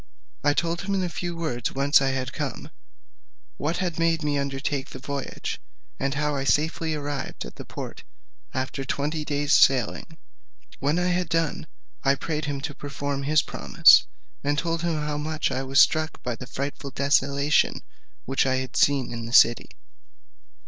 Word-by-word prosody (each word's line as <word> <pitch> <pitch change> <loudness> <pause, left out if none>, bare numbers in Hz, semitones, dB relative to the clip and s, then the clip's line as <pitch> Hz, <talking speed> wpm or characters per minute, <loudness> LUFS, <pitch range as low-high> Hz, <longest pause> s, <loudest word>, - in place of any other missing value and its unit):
I 145 0 +3
told 170 0 0
him 200 0 -2
in 190 - 0
a 180 - -1
few 175 0 -4
words 125 -8 -2
whence 140 +2 +4
I 135 - +2
had 130 -1 -3
come, - - -5 0.9
what 155 +4 -1
had 175 -3 -2
made 165 -1 +2
me 145 -1 0
undertake 140 0 -2
the - - -8
voyage, 140 +1 -5 0.4
and 135 +1 -1
how 150 0 0
I 135 - -1
safely 155 +3 +1
arrived 145 - -4
at - - -10
the - - -8
port - - -8 0.5
after 130 +1 -3
twenty 150 +3 -2
days' 145 0 0
sailing; 130 -5 +3 0.6
when 145 +4 +1
I 180 0 +1
had 180 -1 0
done, 165 +1 -1 0.4
I 135 0 +4
prayed 150 +2 -3
him 140 -2 -3
to 145 +1 -4
perform 140 0 -4
his 150 +2 +3
promise, - - +5 0.4
and 145 +1 0
told 165 +3 -1
him 170 -1 0
how 150 -1 -2
much 155 +1 -1
I 130 - -1
was 135 +1 +2
struck 155 +3 +3
by 125 -2 -2
the 125 - -9
frightful 140 +2 -5
desolation 140 +1 +2 0.4
which 135 +1 +1
I 130 - +2
had 130 -1 -4
seen 140 -4 +2
in 115 -1 -5
the 115 - -7
city. 120 -1 +5
145 Hz, 175 wpm, -25 LUFS, 135-155 Hz, 0.9 s, promise